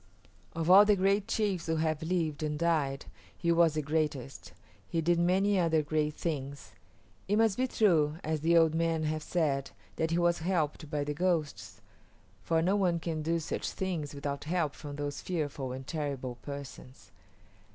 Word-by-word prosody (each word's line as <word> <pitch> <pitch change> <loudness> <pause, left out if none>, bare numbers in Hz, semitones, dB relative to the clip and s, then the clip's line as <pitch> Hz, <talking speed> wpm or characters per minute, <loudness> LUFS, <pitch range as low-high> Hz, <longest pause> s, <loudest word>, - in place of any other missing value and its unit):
Of 165 -1 -3
all 195 +2 +10
the 210 0 +4
great 195 +2 +1
chiefs 200 -7 -1
who 160 - +1
have 155 -1 0
lived 160 -3 -1
and 150 -1 -2
died 150 -4 0 0.3
he 170 - +1
was 165 -2 +4
the 155 - -1
greatest. 145 -3 -2 0.4
He 165 - -1
did 170 +1 +2
many 190 +3 +2
other 160 -3 +2
great 150 0 -1
things. 140 -4 -4 0.6
It 205 - +2
must 220 -2 +3
be 260 +1 0
true, 160 -11 +2
as 155 -1 -2
the 170 +2 +4
old 165 -1 +4
men 165 -1 0
have 155 0 -1
said, 145 -5 -1 0.3
that 160 - 0
he 165 - +1
was 175 0 +2
helped 160 -3 -1
by 145 -1 -1
the 150 +1 -3
ghosts, 165 -2 -2 0.6
for 165 +5 +1
no 190 +4 +2
one 180 -4 +1
can 160 -2 -3
do 165 +2 0
such 160 - -3
things 165 -7 -4
without 140 0 -4
help 160 -3 0
from 145 -2 -8
those 145 0 -4
fearful 145 -7 -3
and 130 +1 -6
terrible 135 -5 -4
persons. 140 -2 -9
160 Hz, 175 wpm, -30 LUFS, 145-175 Hz, 0.6 s, all